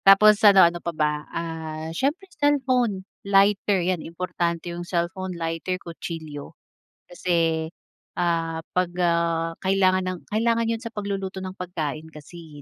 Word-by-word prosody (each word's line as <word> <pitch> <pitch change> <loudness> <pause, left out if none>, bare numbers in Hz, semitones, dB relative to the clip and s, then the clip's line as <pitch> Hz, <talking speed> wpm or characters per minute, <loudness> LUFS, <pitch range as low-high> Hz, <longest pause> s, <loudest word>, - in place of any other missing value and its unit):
Tapos 195 +2 +8
ano, 200 -4 +8
ano 170 0 +1
pa - - -3
ba, 150 -1 +2 0.2
ah, 160 -1 -5
siyempre 285 - -1
cellphone, 255 - +1 0.2
lighter, 200 -1 +3
yan, 180 -2 0
importante 170 0 -3
yung 175 - -5
cellphone, 175 +1 -3
lighter, 165 +2 -2
kutsilyo. 165 -4 -8 0.5
Kasi, 165 -3 0 0.5
ah, 165 -2 0
'pag, 180 -1 +1
ah, 170 -1 +1
kailangan 190 -1 +3
ng 185 -1 -4
kailangan 230 +1 +1
yun 225 - -5
sa 230 - -5
pagluluto 195 -2 -4
ng 185 0 -5
pagkain, 160 -3 -4
kasi 155 -1 -12
175 Hz, 135 wpm, -24 LUFS, 165-195 Hz, 0.5 s, Tapos